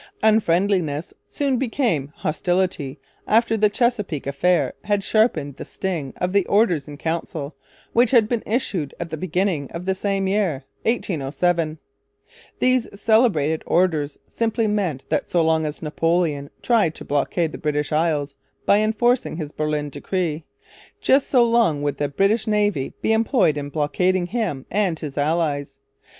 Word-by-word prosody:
Unfriendliness 180 -7 +2 0.2
soon 275 -3 0
became 225 - 0
Hostility 170 -3 -1 0.3
after 225 +1 +3
the 210 -1 +3
Chesapeake 210 - 0
affair 170 +6 +1
had 205 -1 +1
sharpened 215 - +1
the - - -6
sting 170 -8 -4
of 180 +1 -1
the 200 -1 +4
Orders 180 -9 +2
in 145 -1 -9
Council, 160 -2 -4 0.4
which 240 0 +4
had 230 -4 +5
been 235 -1 -1
issued 195 - -1
at 170 -1 -5
the - - -2
beginning 180 -3 -1
of 170 +2 -6
the 190 - +1
same 195 0 -1
year, 190 -8 0 0.2
1807. 165 - 0 0.8
These 255 -5 +1
celebrated 200 - +3
Orders 155 -5 +1
simply 225 0 -1
meant 190 -10 -1
that - - -1
so 170 -2 +2
long 160 -1 +2
as 150 +2 -7
Napoleon 160 -2 0
tried 215 -10 +2
to - - -9
blockade 155 +3 0
the - - -8
British 150 -1 -1
Isles 150 -3 0 0.3
by 200 - +5
enforcing 225 -2 +1
his 150 -4 -5
Berlin 150 -1 -2
Decree, 160 +1 -2 0.5
just 270 +1 +3
so 250 -3 +5
long 230 -11 +2
would 145 -1 -1
the 145 -1 0
British 200 +10 +1
Navy 205 -10 0
be 220 - +3
employed 220 - +2
in 145 -1 -4
blockading 175 +5 +1
him 180 - -3
and 190 -4 +1
his 145 -3 -6
allies. 145 -2 -1
175 Hz, 150 wpm, -22 LUFS, 150-210 Hz, 0.8 s, had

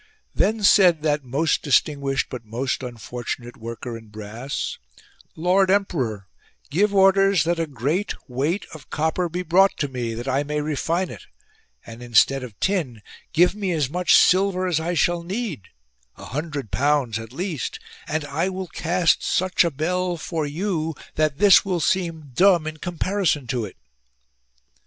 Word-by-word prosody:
Then 215 0 +1
said 180 -6 +5
that 150 -2 +1
most 140 +6 0
distinguished, 140 -1 +1
but 125 -2 -6
most 120 +6 -3
unfortunate 120 0 -6
worker 115 0 -7
in 110 -1 -11
brass: 110 +5 -5 0.6
Lord 185 +3 +2
emperor, 130 - 0 0.4
give 200 +7 +2
orders 195 -1 +4
that 170 +1 0
a 165 - -1
great 145 - -2
weight 145 +10 -1
of 155 - -12
copper 160 +3 -1
be 180 +2 -3
brought 190 +4 +4
to 145 - -1
me 120 -4 -4
that 120 +3 -6
I 135 +1 +1
may 150 +1 -2
refine 165 +4 -1
it; 105 - -11 0.6
and 115 +1 -10
instead 120 +3 +3
of 120 -5 -10
tin 150 - -1 0.3
give 175 +3 +4
me 200 -3 -2
as 145 -4 -1
much 180 +2 +3
silver 185 0 +4
as 175 -4 +1
I 170 +2 -2
shall 175 +1 +2
need 185 - -4 0.3
— - - -39
a - - -10
hundred 145 -3 -5
pounds 140 -5 +1
at 115 0 -9
least; 160 - -4 0.3
and 155 0 -2
I 150 +6 -1
will 185 -1 -5
cast 175 +1 +1
such 185 0 +2
a 170 - +1
bell 175 +4 -1
for 160 -2 -3
you 160 0 -2 0.2
that 155 -2 0
this 200 0 +7
will 185 -3 -1
seem 165 -4 -1
dumb 180 0 +4
in 155 0 -5
comparison 175 -3 -1
to 120 -3 -1
it." 100 - -11
155 Hz, 160 wpm, -23 LUFS, 130-180 Hz, 0.6 s, this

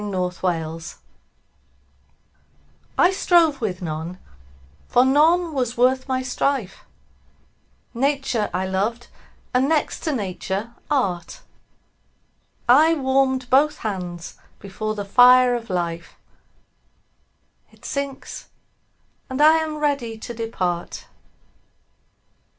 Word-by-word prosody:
9 205 -1 -5
Autoplay 170 -3 -3 2.0
I 355 - +5
strove 340 -7 +3
with 190 -4 -3
none, 160 +2 -5 0.7
for 245 +1 +4
none 320 +5 +3
was 250 -3 -2
worth 260 +2 +2
my 260 -1 -1
strife: 255 -5 -2 1.1
Nature 265 -4 0
I 185 +1 -2
loved, 210 +6 -2 0.4
and, 260 +3 +2
next 315 -2 0
to 315 - -2
Nature, 205 -1 -4 0.2
Art: 190 - -1 1.3
I 310 +7 +6
warm'd 265 -2 +1
both 290 +3 +4
hands 180 -4 -5 0.2
before 215 +2 -5
the 205 -1 -5
fire 250 +3 +6
of 235 -1 -4
Life; 170 -2 -3 1.6
It - - -19
sinks; 280 -1 -5 0.8
and 260 +1 -4
I 310 +2 +6
am 315 -1 -2
ready 280 -7 -1
to 240 +2 -7
depart. 185 -7 -3
245 Hz, 100 wpm, -22 LUFS, 190-275 Hz, 2.0 s, I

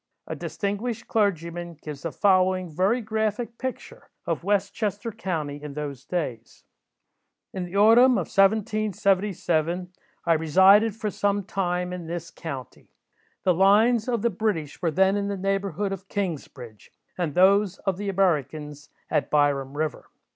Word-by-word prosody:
A - - -5
distinguished 205 +3 -4
clergyman 175 -5 -1
gives 150 -2 -9
the 165 - -4
following 185 -2 +2
very 195 +10 +1
graphic 220 +1 -2
picture 260 -1 -6 0.2
of - - -2
West 200 0 +1
Chester 210 +2 -3
county 155 -8 -4
in 150 -2 -8
those 145 -4 -6
days:— 130 -10 -4 0.9
"In 185 -2 -3
the 175 +2 -9
autumn 230 +5 +6
of 190 -8 0
1777, 195 -4 +1 0.3
I 170 - +4
resided 190 +7 +5
for 215 -2 -3
some 205 0 0
time 180 -2 -2
in 175 -2 -6
this 170 0 -5
county. 135 -7 -8 0.5
The 185 - +4
lines 215 +6 +4
of 235 -3 -1
the 235 - +2
British 175 -8 -2
were 170 - +1
then 190 +4 +3
in 200 0 -1
the 200 -1 -3
neighbourhood 195 0 -1
of 195 0 -6
Kingsbridge, 140 - -5 0.2
and 170 -5 -3
those 195 +1 +4
of 195 -3 -2
the 205 0 -3
Americans 150 -5 -1 0.2
at - - +1
Byram 145 -2 +1
river. 155 -1 -3
190 Hz, 145 wpm, -25 LUFS, 160-205 Hz, 0.9 s, autumn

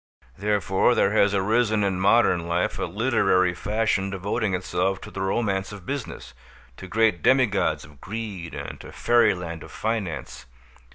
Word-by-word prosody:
Therefore 100 +2 +1
there 100 - +3
has 100 -1 +3
arisen 110 +2 +2
in 95 -2 0
modern 95 -4 +3
life 85 +1 -1
a - - 0
literary 95 -2 +2
fashion 105 0 0
devoting 100 +1 -1
itself 95 +1 -1
to - - -10
the 95 - -5
romance 95 0 -1
of 100 -3 -10
business, 130 - -6 0.4
to 95 - -9
great 110 -3 +2
demigods 105 - +2
of 75 -2 -18
greed 100 -5 -6
and - - -7
to - - -11
fairyland 90 -9 +1
of - - -11
finance. 110 -6 -4
100 Hz, 150 wpm, -24 LUFS, 90-110 Hz, 0.4 s, there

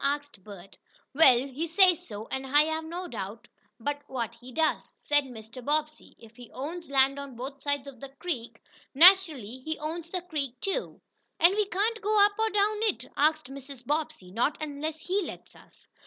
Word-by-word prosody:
asked 285 -7 -2
Bert. 195 -2 -12 0.3
"Well, 270 -4 +7
he 285 +5 -4
says 360 0 +4
so, 210 0 -7
and 265 - -2
I 290 +3 +6
have 315 +1 -2
no 350 +3 -5
doubt 215 - -7 0.3
but 290 +4 -3
what 240 -4 -3
he 245 +2 -13
does," 315 +4 0
said 290 -1 +1
Mr. 240 0 -10
Bobbsey. 305 +2 -2
"If 225 -1 -16
he 245 -1 -12
owns 325 +6 -6
land 275 0 +3
on 280 -3 -8
both 270 +3 -7
sides 285 -1 -1
of 275 -4 -11
the 275 - -8
creek, 260 -6 -5 0.4
naturally 310 - +6
he 315 +4 -4
owns 325 +2 -5
the 360 -1 -4
creek, 280 -8 -4
too." 395 - -3 0.4
"And 345 +3 +6
we 420 0 +1
can't 430 +4 -1
go 425 0 +2
up 410 - +1
or 445 0 +2
down 420 0 +1
it?" 445 -2 0
asked 305 -2 +2
Mrs. 270 -1 -10
Bobbsey. 290 -10 -2
"Not 240 +8 0
unless 310 +1 -4
he 385 +3 0
lets - - -8
us." - - -20
290 Hz, 185 wpm, -28 LUFS, 255-335 Hz, 0.4 s, Well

